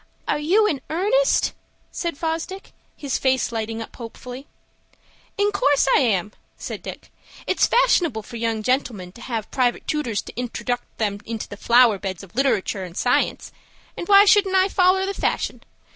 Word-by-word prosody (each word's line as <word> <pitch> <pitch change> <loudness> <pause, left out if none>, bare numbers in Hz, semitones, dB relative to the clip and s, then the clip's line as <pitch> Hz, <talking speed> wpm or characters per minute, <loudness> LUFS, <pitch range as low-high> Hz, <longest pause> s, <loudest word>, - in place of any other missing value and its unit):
"Are - - 0
you 375 +9 +3
in 290 -10 0
earnest?" 420 +10 +2 0.4
said 340 -4 -3
Fosdick, 330 +5 -4 0.2
his 280 -3 -2
face 260 -2 +1
lighting 225 0 -3
up - - -14
hopefully. 250 +3 -9 0.9
"In 410 0 +2
course 290 -9 +2
I - - +5
am," 210 -7 +1 0.3
said - - -6
Dick. - - -9 0.3
"It's - - +2
fashionable 350 - +2
for 235 +2 -9
young 225 -1 -1
gentlemen 230 -7 -1
to 235 - -15
have 230 -4 -4
private 250 -3 0
tootors 260 -9 -1
to - - -10
introduct 245 0 -4
'em 205 -2 -1
into 225 -1 -5
the - - -8
flower 235 -1 +4
beds 190 -2 -5
of 190 - -14
literatoor 225 -7 +1
and 180 -1 -9
science, 245 0 0 0.4
and 345 - -6
why 400 0 +8
shouldn't 400 -2 +4
I 380 +1 +4
foller 375 0 +3
the 395 - -2
fashion? - - -2
255 Hz, 165 wpm, -22 LUFS, 225-360 Hz, 0.9 s, why